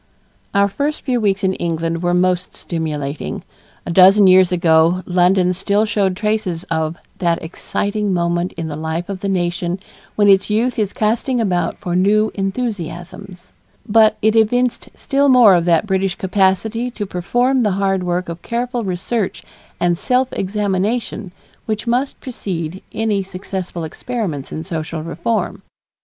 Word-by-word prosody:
Our 200 0 +4
first 285 +9 -2
few 250 -3 0
weeks 200 -2 +1
in 190 0 +2
England 165 -1 -2
were 175 0 +1
most 180 0 0
stimulating. 150 -4 -4 0.4
A - - -3
dozen 195 +3 +7
years 185 -1 +6
ago 170 0 +3
London 180 0 +3
still 200 +3 +1
showed 195 -3 0
traces 210 -5 -1
of 160 0 -1 0.2
"that 170 -2 +1
exciting 205 +5 -2
moment 175 0 0
in 165 -1 -5
the 150 - -5
life 160 +4 -4
of 195 -2 -4
the 200 - -3
nation 175 -1 -1 0.4
when 205 -1 +3
its 195 0 +5
youth 230 +3 +1
is 205 -2 0
casting 235 +4 0
about 180 -6 0
for 175 -1 -3
new 210 +4 +3
enthusiasms," 190 -3 -5 0.3
but 215 0 +4
it 220 +1 +3
evinced 245 +3 +1
still 280 +1 +1
more 245 -6 +7
of 170 -2 +2
that 170 0 +3
British 190 -1 0
capacity 195 +5 +1
to 225 -4 -5
perform 245 +9 +1
the 210 -4 +1
hard 195 -1 +1
work 180 0 -1
of 170 0 -7
careful 240 0 -2
research 195 +3 -2 0.4
and 175 -1 +1
self 255 +3 +1
examination 205 +1 -2 0.4
which 215 0 -2
must 250 +4 -1
precede 185 -8 -5
any 215 -3 0
successful 185 -2 -6
experiments 165 - -4
in 160 - -4
social 160 -2 -4
reform. 170 +7 -2
190 Hz, 150 wpm, -18 LUFS, 175-215 Hz, 0.4 s, dozen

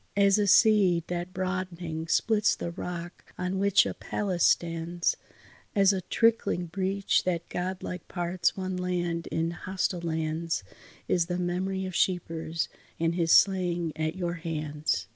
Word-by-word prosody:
As 200 0 +5
a 205 - +2
seed 195 -4 +5
that 175 +1 -3
broadening 180 -4 -3
splits 215 +4 +2
the 170 - -4
rock 175 0 -7
on 180 +1 -2
which 200 0 +4
a - - -2
palace 185 -4 -2
stands, 170 0 +1 0.6
As 200 -1 +5
a 190 - -2
trickling 225 -3 +1
breach 195 +3 0
that 170 -2 -1
godlike 180 0 -4
parts 175 +1 -1
one 185 -1 -3
land 175 -2 -2
in 165 +1 -1
hostile 180 0 -2
lands, 160 - -2 0.4
Is 170 -2 +2
the 175 -1 -2
memory 185 +2 -1
of 185 -2 -6
Scheepers 165 -3 0 0.3
and 165 0 +1
his 170 -2 +1
slaying 175 -4 +3
at 155 +1 -2
your 175 -2 -2
hands. 155 -2 -2
175 Hz, 145 wpm, -28 LUFS, 170-190 Hz, 0.6 s, As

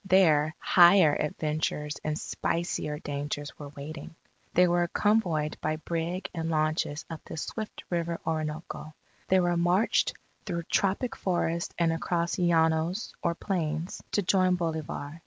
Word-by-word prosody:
There, 160 -5 +4
higher 175 -3 +6
adventures 150 0 -2
and 155 0 -1
spicier 165 -4 -2
dangers 145 0 -5
were 145 -1 -7
waiting. 145 +3 -8 0.4
They 180 +1 +6
were 175 0 +2
convoyed 175 -7 +1
by 155 0 0
brig 170 +3 -3
and 165 -1 -3
launches 155 -1 0
up 165 -1 -7
the - - -8
swift 215 +7 -5
river 170 -1 -1
Orinoco. 155 -1 -4 0.3
They 190 - +4
were 175 -1 +2
marched 175 +5 +2 0.3
through 170 -1 -2
tropic 200 +8 0
forest 170 -2 -1
and 165 -1 +2
across 170 +1 -1
llanos 165 +2 +2
or 170 0 0
plains, 165 -3 -2
to 205 - +2
join 185 0 +3
Bolivar. 160 -2 -4
165 Hz, 135 wpm, -28 LUFS, 155-175 Hz, 0.4 s, higher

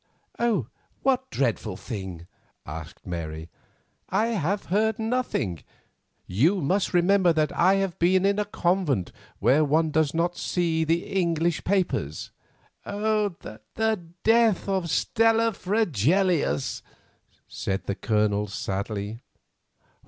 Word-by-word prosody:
"What 260 0 +1
dreadful 120 -5 -1
thing?" 95 -7 -6 0.4
asked 80 +2 -9
Mary. 80 -2 -5 0.6
"I 215 +4 +1
have 200 -2 -1
heard 220 +5 +1
nothing; 220 - -2 0.6
you 150 - +2
must 185 +6 0
remember 180 0 +4
that 155 -2 0
I 185 +3 +4
have 195 -3 -1
been 185 +2 +3
in 200 +1 +2
a 210 - 0
convent 175 - 0 0.3
where 150 +4 +4
one 155 +2 +2
does 155 0 +1
not 170 +1 +1
see 165 -2 0
the 165 +2 0
English 170 -3 0
papers." 175 - -1 0.5
"The 205 - -2 0.6
death 225 -4 +3
of 190 -3 -1
Stella 225 +5 +2
Fregelius," 180 - +1 0.7
said 95 0 -3
the 100 - -1
Colonel 105 0 0
sadly. 105 +1 -4
170 Hz, 110 wpm, -26 LUFS, -, 0.7 s, remember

